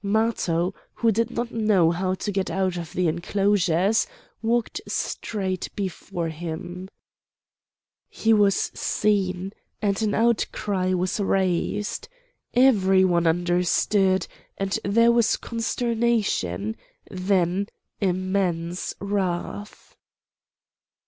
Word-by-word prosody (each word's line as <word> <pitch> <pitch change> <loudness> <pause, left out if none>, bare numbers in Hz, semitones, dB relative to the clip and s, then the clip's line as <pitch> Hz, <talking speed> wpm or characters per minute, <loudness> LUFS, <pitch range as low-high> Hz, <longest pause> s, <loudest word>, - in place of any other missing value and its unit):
Matho, 200 -4 +1 0.2
who 230 -1 +2
did 230 +2 +1
not 240 0 -3
know 210 -7 +3
how 185 +2 -1
to 205 - -3
get 195 -1 -1
out 190 -2 0
of 170 -2 -6
the 180 -1 +1
enclosures, 190 +3 +2 0.3
walked 230 +1 0
straight 190 -4 -3
before 185 -3 -3
him. 175 +3 -6 1.2
He 225 0 +2
was 205 -3 +3
seen, 195 -2 0 0.3
and 200 0 0
an 215 -2 +1
outcry 205 -5 +1
was 185 +3 -1
raised. 195 - 0 0.5
Every 195 -7 +5
one 175 -2 +2
understood; 180 +3 +2 0.3
and 195 -1 -1
there 230 +4 +4
was 235 -2 +3
consternation, 230 - -1 0.3
then 185 0 +1 0.3
immense 185 -2 -1
wrath. 200 0 -3
195 Hz, 95 wpm, -24 LUFS, 180-210 Hz, 1.2 s, Every